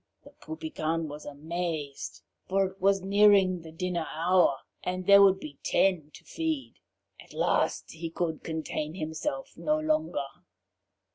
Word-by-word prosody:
The - - -15
Poupican 165 - -3
was 150 +1 -8
amazed, 155 -1 -4 0.3
for 195 +1 +3
it 190 0 -8
was 195 0 +3
nearing 195 -2 +5
the 160 -1 -11
dinner 170 0 -2
hour, 170 -3 +3 0.3
and 185 0 -3
there 200 +1 +8
would 195 -1 +6
be 145 -5 -9
ten 180 -6 +2
to - - -14
feed. 320 -4 -3 0.5
At - - -17
last - - +1
he 165 +1 -5
could 165 -1 -2
contain 160 -1 -3
himself 195 - -4
no 305 0 0
longer. 310 - 0
180 Hz, 140 wpm, -28 LUFS, 160-200 Hz, 0.5 s, there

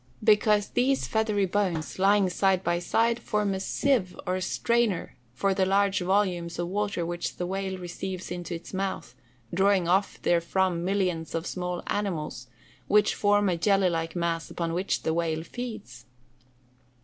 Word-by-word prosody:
_ - - -35 0.2
Because 210 -1 +4
these 265 +2 +1
feathery 215 -3 +1
bones, 180 -5 -1
lying 200 0 +4
side 190 0 +1
by 170 0 +1
side, 230 +6 +1
form 210 -3 0
a 190 - -2
sieve, 200 -2 0
or 185 +1 -1
strainer, 230 -1 0 0.2
for 195 +11 0
the 190 0 +1
large 195 +1 +2
volumes 180 -3 0
of 175 0 -2
water 200 -3 -1
which 175 0 -3
the 180 - -3
whale 190 +1 -3
receives 180 +1 -6
into 175 -1 -4
its 165 - -10
mouth, 190 -8 -3 0.4
drawing 190 -1 +3
off 190 +3 +2
therefrom 175 +1 +1
millions 180 -4 -1
of 165 +1 -2
small 180 -1 -3
animals, 165 -10 -3 0.4
which 210 0 +4
form 205 0 +2
a 180 - +2
jelly 195 0 +3
like 165 0 -3
mass 170 -1 -1
upon 165 -1 -3
which 185 +3 -1
the 160 - 0
whale 160 -1 -1
feeds. 170 - -7
190 Hz, 160 wpm, -27 LUFS, 175-205 Hz, 0.4 s, Because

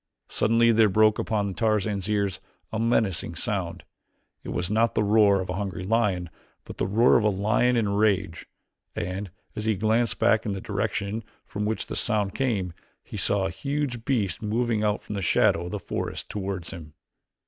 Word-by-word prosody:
Suddenly 115 +1 +3
there 110 -1 +5
broke 110 +2 +4
upon 105 -3 -1
Tarzan's 105 -2 0
ears 100 -3 0 0.3
a 110 - -1
menacing 115 -6 +1
sound. - - -2 0.6
It - - -7
was 90 +2 -2
not 115 +2 +2
the 110 - +2
roar 100 -2 +4
of 95 - -5
a - - -1
hungry 95 -3 -4
lion, 95 -5 0 0.3
but - - -9
the - - 0
roar 115 +5 +5
of 115 - +1
a 105 - +4
lion 105 +5 +2
in 110 -3 +1
rage, 100 -3 0 0.5
and, 95 +3 -4 0.3
as 105 - -4
he 110 -1 +2
glanced 110 +4 +1
back 110 -1 +3
in 105 - -2
the 95 - -4
direction 100 +3 -2 0.2
from 105 0 -4
which 110 +1 -2
the - - -6
sound 105 -3 +1
came, 105 -10 -1 0.3
he - - -10
saw 100 -1 +1
a 95 - -2
huge 140 - -3
beast 110 - -1
moving 110 0 0
out 105 -1 0
from - - -7
the 100 - -3
shadow 85 -1 +3
of 90 - -6
the 105 - -2
forest 95 - -5
toward 95 -4 -4
him. 80 -3 -9
105 Hz, 185 wpm, -26 LUFS, 95-110 Hz, 0.6 s, there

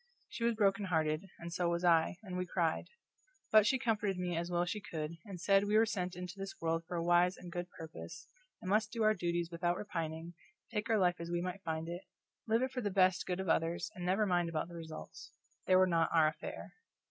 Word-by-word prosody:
She 235 - -5
was 235 0 +2
broken 200 -1 +2
hearted, 160 0 0
and 170 0 -7
so 175 -1 +1
was 170 +1 -1
I, 170 0 +4
and 185 -3 -6
we 180 0 -2
cried; 170 -3 0 0.6
but 215 -1 +7
she 260 - +3
comforted 210 -5 0
me 180 -1 -2
as 170 +1 -2
well 175 0 +1
as 175 - -3
she 210 - -3
could, 155 -6 -4
and 195 -4 -7
said 195 +3 +4
we 210 +1 +3
were 225 - +6
sent 185 -5 -2
into 180 +2 -7
this 195 0 -6
world 165 0 0
for 175 - -4
a 165 - -1
wise 175 +2 +4
and 175 - -9
good 175 0 -4
purpose, 155 - -9 0.4
and 185 - -4
must 215 +1 +2
do 230 -2 -1
our 215 0 +5
duties 175 -2 -1
without 175 +1 0
repining, 165 -4 -4 0.4
take 210 +1 -2
our 225 - +4
life 180 -2 +2
as 170 0 -5
we 175 0 0
might 180 +2 -4
find 160 -1 -3
it, 175 +2 -5 0.5
live 225 +3 +3
it 260 - -1
for 255 - -3
the 205 - 0
best 185 -1 +3
good 180 0 -1
of 190 - -3
others, 165 +1 +1
and 180 - -7
never 190 +4 +2
mind 175 -3 +1
about 165 +1 -2
the 170 - -9
results; 160 - -9 0.3
they 185 - +5
were 185 0 +7
not 165 -2 +2
our 160 -2 +5
affair. 155 0 -8
180 Hz, 240 wpm, -34 LUFS, 170-195 Hz, 0.6 s, but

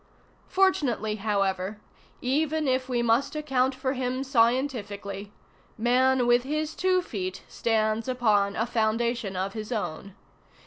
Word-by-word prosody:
Fortunately, 275 - +1
however, 195 -1 -1
ŌĆö - - -31
even 305 +4 0
if 260 0 0
we 240 -1 +1
must 240 +6 +2
account 270 -3 +1
for 260 0 -1
him 255 0 -2
scientifically, 230 -6 0 0.5
man 250 +2 +3
with 240 0 +4
his 305 +4 -2
two 370 0 +2
feet 185 - -5
stands 220 0 0
upon 215 -5 +2
a 225 - 0
foundation 230 -2 0
of 190 +2 -2
his 215 +1 -6
own. 200 -3 -4
240 Hz, 130 wpm, -27 LUFS, 210-260 Hz, 0.5 s, with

